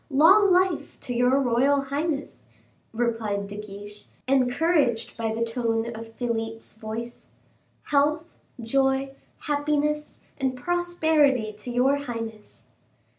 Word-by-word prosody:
"Long 375 +8 +6
life 365 -1 +1
to 245 - -4
your 250 +3 +3
royal 270 +2 +3
highness!" 285 +2 -3 0.4
replied 225 -3 -1
De 200 +1 -8
Guiche, 205 0 -10 0.2
encouraged 255 -2 +2
by 225 -1 -2
the 230 +1 -1
tone 230 0 -1
of 225 0 -10
Philip's 225 -2 -4
voice; 225 +2 -7 0.6
"health, 295 +2 +2 0.4
joy, 270 +3 +1 0.3
happiness, 300 0 -1 0.2
and 265 -1 0
prosperity 315 -7 +1
to 210 +4 -9
your 255 +3 +2
highness." 230 -5 -7
250 Hz, 110 wpm, -25 LUFS, 225-290 Hz, 0.6 s, Long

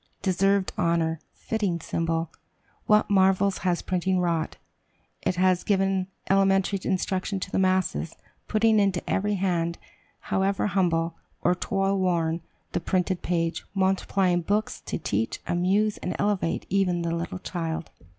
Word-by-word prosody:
Deserved 195 +1 +2
honor! 165 -2 +1
fitting 205 -6 -2
symbol! 165 0 -2 0.6
What 210 0 +4
marvels 195 0 +3
has 175 -1 0
printing 185 0 0
wrought. 170 -3 -1 0.6
It 185 - 0
has 185 0 +3
given 195 -2 +1 0.2
elementary 195 0 +3
instruction 190 +1 -1
to 190 - -6
the - - +1
masses, 185 - +1 0.3
putting 220 0 +3
into 195 -3 +1
every 205 +1 +1
hand, 175 -3 0 0.6
however 195 +1 +1
humble 170 -4 +1 0.3
or - - +4
toilworn, 185 -4 0 0.3
the - - 0
printed 180 +1 0
page, 165 -1 -1
multiplying 190 -1 +2
books 205 +5 -1
to - - -2
teach, 110 -7 -2
amuse, 195 +5 +1
and 180 - -3
elevate 205 -5 0
even 180 -3 +1
the 165 0 -1
little 170 +2 -4
child. 165 -3 -4
185 Hz, 130 wpm, -26 LUFS, 170-195 Hz, 0.6 s, What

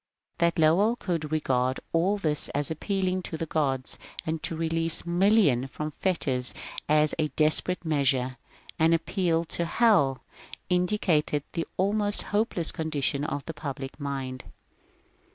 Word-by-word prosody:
That 170 0 +2
Lowell 175 +9 +4
could 165 -9 -3
re 155 - +1
gard 130 -1 0
all 180 +5 +2
this 155 -6 0
as 145 +2 +1
appealing 185 +2 -1
to 165 - -6
the 165 - -3
gods, 135 -5 -2 0.3
and 160 0 -2
to 165 - -3
release 165 0 0
millions 175 - +3
from 150 +4 -5
fetters 135 -8 +2 0.3
as 150 0 +4
a 155 - +2
^^ - - -29
desperate 160 +3 +3
measure," 135 -4 0 0.4
an 160 +1 +4
appeal 165 0 0
to 170 - -2
^' - - -2
Hell,'' 175 - +3 0.5
indicated 180 -5 +1
the 165 - -3
almost 205 +2 +1
hopeless 205 -6 0
condition 145 -3 -1
of 145 -2 -3
the 165 - -5
public 140 -2 -7
mind. 135 -3 -4
160 Hz, 145 wpm, -27 LUFS, 145-180 Hz, 0.5 s, Lowell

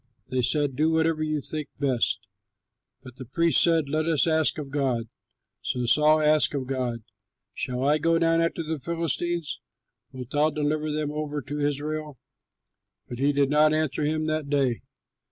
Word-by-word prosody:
They 130 0 0
said, 145 +1 0
"Do 155 +4 +2
whatever 160 -1 +1
you 155 -1 -1
think 150 +1 -4
best." 125 -6 0 0.8
But 130 -2 -12
the 130 - -8
priest 165 +7 +3
said, 165 -3 +3
"Let 155 +3 -1
us 160 -3 +3
ask 160 -2 +2
of 145 -3 -6
God." 130 -6 -1 0.5
So 125 -1 -2
Saul 150 +5 +4
asked 150 -1 +3
of 135 -2 -2
God, 125 -3 -3 0.5
"Shall 125 0 -3
I 150 +1 +3
go 165 +2 +2
down 165 0 +2
after 165 0 -1
the 160 -1 -3
Philistines? 170 +1 -2 0.5
Wilt 130 0 -9
thou 150 +1 +3
deliver 155 0 -1
them 150 -1 -2
over 150 -1 -3
to 145 +4 -5
Israel?" 150 0 -3 0.9
But 120 - -7
he 140 +2 +3
did 140 -1 +1
not 155 +1 +4
answer 155 -1 -1
him 155 +1 0
that 155 -2 -2
day. 135 -5 +1
150 Hz, 170 wpm, -26 LUFS, 135-155 Hz, 0.9 s, Saul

